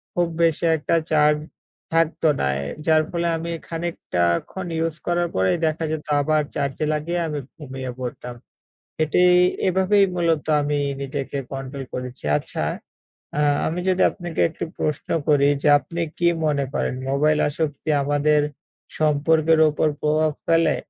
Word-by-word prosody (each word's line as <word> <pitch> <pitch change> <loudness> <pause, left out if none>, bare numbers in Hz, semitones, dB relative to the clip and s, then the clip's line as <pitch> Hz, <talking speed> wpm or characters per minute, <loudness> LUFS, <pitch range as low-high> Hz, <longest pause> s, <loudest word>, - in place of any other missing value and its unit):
খুব 175 -1 +2 0.2
বেশি 165 0 +2
একটা 155 +3 0 0.2
চার্জ 150 -1 +4 0.6
থাকত 165 0 +1 0.2
না। - - +1 0.2
এ - - -4 0.2
যার 155 -1 +5
ফলে 170 0 -1
আমি 170 +1 -4 0.2
খানিকটা 165 - -2 0.3
ক্ষণ 185 -1 -5
ইউজ 165 -1 -1
করার 175 0 +1
পরে 95 0 +2 0.2
দেখা 160 +1 -1
যেত 155 -1 -4 0.2
আবার 155 +1 +2
চার্জে 140 +1 -1
লাগিয়ে 170 +3 -2
আমি 150 -1 -3 0.2
ঘুমিয়ে 130 -4 -6
পড়তাম। 125 -1 -6 0.7
এটি 155 +3 +2 0.5
এভাবেই 190 +2 +3
মূলত 165 -3 +1 0.2
আমি 145 0 0 0.2
নিজেকে 140 0 -4
কন্ট্রোল 135 0 -5
করেছি। 125 - -6
আচ্ছা, - - -4 0.7
আ - - +2 0.3
আমি 175 +3 -2
যদি 185 0 +2
আপনাকে 175 -3 -5
একটি 160 - -5
প্রশ্ন 150 -3 -2 0.2
করি 145 -1 +4
যে, 150 - +3
আপনি 170 +3 -6 0.2
কি 170 0 +3 0.2
মনে 140 -2 +1
করেন, - - -1 0.2
মোবাইল 150 +2 +2
আসক্তি 150 +1 -3
আমাদের 145 +1 +2 0.6
সম্পর্কের 155 +1 +3
উপর 155 +1 +1
প্রভাব 155 0 +2
ফেলে? 165 -1 +3
155 Hz, 145 wpm, -22 LUFS, 145-165 Hz, 0.7 s, যার